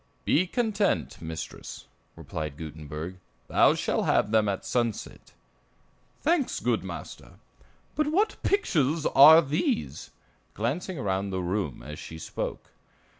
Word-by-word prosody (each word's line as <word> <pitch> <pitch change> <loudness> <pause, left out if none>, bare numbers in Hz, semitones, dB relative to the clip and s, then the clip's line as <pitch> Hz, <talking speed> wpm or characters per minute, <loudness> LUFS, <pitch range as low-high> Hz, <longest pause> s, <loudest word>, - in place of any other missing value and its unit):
"Be 180 +4 +3
content, 215 -1 0
mistress," 80 -1 -7 0.3
replied 75 -3 -6
Gutenberg; 80 +2 -7 0.3
"thou - - +4
shall - - 0
have 105 - +2
them 110 -2 +3
at 95 - -3
sunset." 120 -4 -3 0.9
"Thanks, 315 -4 +1
good - - 0
master; - - -8 0.6
but 305 -1 0
what 405 +8 +1
pictures 160 - +1
are 160 +4 +8
these?" 130 - -2 0.5
glancing 155 - -2
around 100 -4 -1
the 95 -1 -2
room 90 - -2
as 75 0 -8
she 80 - -8
spoke. 80 - -5
110 Hz, 120 wpm, -27 LUFS, -, 0.9 s, are